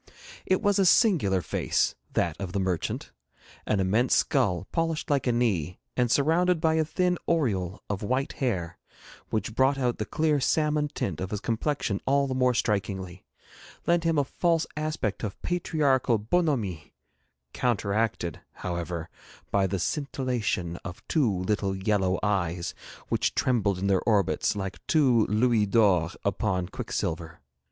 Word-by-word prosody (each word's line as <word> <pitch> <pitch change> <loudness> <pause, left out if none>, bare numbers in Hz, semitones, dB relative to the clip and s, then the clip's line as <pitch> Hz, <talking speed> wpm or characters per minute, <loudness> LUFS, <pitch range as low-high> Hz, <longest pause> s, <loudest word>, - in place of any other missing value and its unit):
It 185 +3 +2
was 205 -1 +3
a 195 - +4
singular 160 - +4
face, - - 0 0.2
that 85 -3 +1
of 90 -2 -4
the 100 - 0
merchant; 95 -3 -2 0.6
an 105 - +1
immense 105 +7 +2
skull, 100 - +1
polished 165 -2 -1
like 140 -2 +1
a - - +4
knee, 100 -9 0 0.2
and 125 -1 +2
surrounded 165 +7 +3
by 160 0 +2
a 160 0 +3
thin 180 +3 0
aureole 105 - 0
of 100 -2 -3
white 130 +6 -1
hair, 90 -10 -2 0.5
which 110 +1 -2
brought 135 +3 +3
out 125 -3 0
the 105 - -1
clear 155 +3 +1
salmon 150 +2 +1
tint 95 - -4
of 95 - -3
his 105 - -3
complexion 115 -2 -1
all 140 +1 +3
the 135 - -2
more 125 -1 +2
strikingly, 95 -4 -2 0.6
lent 170 0 +2
him 165 -2 +1
a 145 - +4
false 165 +3 +1
aspect 150 -9 -2
of 105 -3 -4
patriarchal 145 -8 +1
bonhomie, 110 - -1 0.6
counteracted, 105 -6 -1
however, 85 -2 -4 0.4
by 100 -1 +2
the 95 +1 -2
scintillation 120 - -2
of 90 0 -10
two 140 -9 +2
little 95 +1 -1
yellow 95 -1 +1
eyes 90 -4 -1 0.4
which - - 0
trembled 105 -7 +1
in 95 - -3
their 95 -2 +2
orbits 105 -4 +1
like 95 -1 -4
two 130 -8 +4
louis 110 0 +2
d'or 100 -6 +3 0.2
upon 95 -2 0
quicksilver. 85 -2 -4
110 Hz, 145 wpm, -27 LUFS, 95-145 Hz, 0.6 s, a